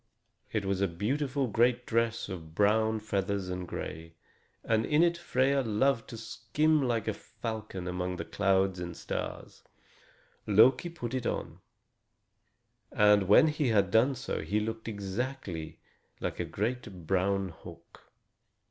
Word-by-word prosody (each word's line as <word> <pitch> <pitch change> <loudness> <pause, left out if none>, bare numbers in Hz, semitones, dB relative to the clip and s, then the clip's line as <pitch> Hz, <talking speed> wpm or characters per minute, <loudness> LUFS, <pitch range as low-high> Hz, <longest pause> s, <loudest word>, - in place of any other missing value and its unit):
It 105 -3 -1
was 95 0 0
a 100 - +3
beautiful 130 - -1
great 120 +2 +2
dress 115 0 0
of 80 -5 -8
brown 110 +2 +3
feathers 100 -2 -2
and 90 -1 -4
gray, 80 +1 -6 0.5
and 110 -1 +2
in 150 +7 +3
it 170 0 +3
Freia 140 -5 +1
loved 115 +2 +1
to 115 - -7
skim 125 +7 +1
like 120 -5 0
a 110 - +1
falcon 110 -4 -6
among 90 0 -2
the - - -5
clouds 95 -2 +1
and 85 -1 -6
stars. - - -5 0.9
Loki 125 - +5
put 130 -8 -6
it 130 -3 -1
on, - - -4 1.3
and 105 -2 +4
when 130 +10 +7
he 150 -2 0
had 100 -5 +2
done 125 +6 +4
so 125 - -3
he 105 - 0
looked 110 +1 -4
exactly 100 -5 -4 0.4
like - - -4
a - - -1
great 105 -5 -4
brown 95 +2 +1
hawk. 85 - -14
110 Hz, 140 wpm, -30 LUFS, 95-125 Hz, 1.3 s, when